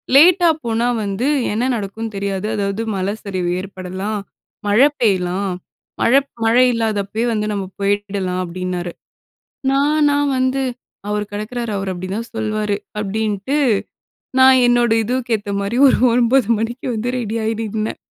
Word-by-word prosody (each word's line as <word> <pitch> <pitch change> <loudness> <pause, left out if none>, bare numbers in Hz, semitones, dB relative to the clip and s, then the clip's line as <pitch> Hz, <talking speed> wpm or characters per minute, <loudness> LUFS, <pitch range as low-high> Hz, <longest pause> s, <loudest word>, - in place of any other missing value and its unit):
லேட்டா 345 +4 +7 0.2
போனா 230 +1 +1 0.2
வந்து, 200 +5 -1 0.2
என்ன 240 +5 0
நடக்குனு 220 +1 -5
தெரியாது. 200 +1 -2
அதாவது 200 +1 -1
மல 190 +2 -1
சரிவு 185 -3 -2
ஏற்படலாம். 190 +2 -5 0.5
மழ 205 +3 +3 0.2
பெய்யலாம். 190 -3 +1 0.5
மழ, 235 - +3 0.3
மழை 245 +3 +5
இல்லாதப்பயே 220 -1 -1
வந்து, 210 0 -1
நம்ம 200 -2 -2 0.2
போயிடலாம், 200 -2 -1
அப்பிடின்னாரு. 180 0 -4 0.8
நான் 295 +2 +3
நான் 285 0 +2
வந்து 260 +1 +1 0.5
அவர் 210 0 -1
கெடக்குறாரு. 220 +2 -4
அவர் 195 0 -3
அப்பிடி 185 +1 -6
தான் 230 +1 -5
சொல்வாரு. 215 -2 -1 0.2
அப்பிடின்ட்டு, 210 +4 -1 0.8
நான் 260 0 +7
என்னோட 240 -1 +3
இதூவுக்கு 245 0 -1
ஏத்த 205 0 -6
மாரி, 200 +4 -2
ஒரு - - +3 0.2
9:00 245 0 +3
மணிக்கு 235 +4 -3
வந்து 225 +3 -2
ரெடி 225 -1 -3
ஆயி 225 +1 0
நின்னேன் 215 0 -3
215 Hz, 135 wpm, -19 LUFS, 195-240 Hz, 0.8 s, லேட்டா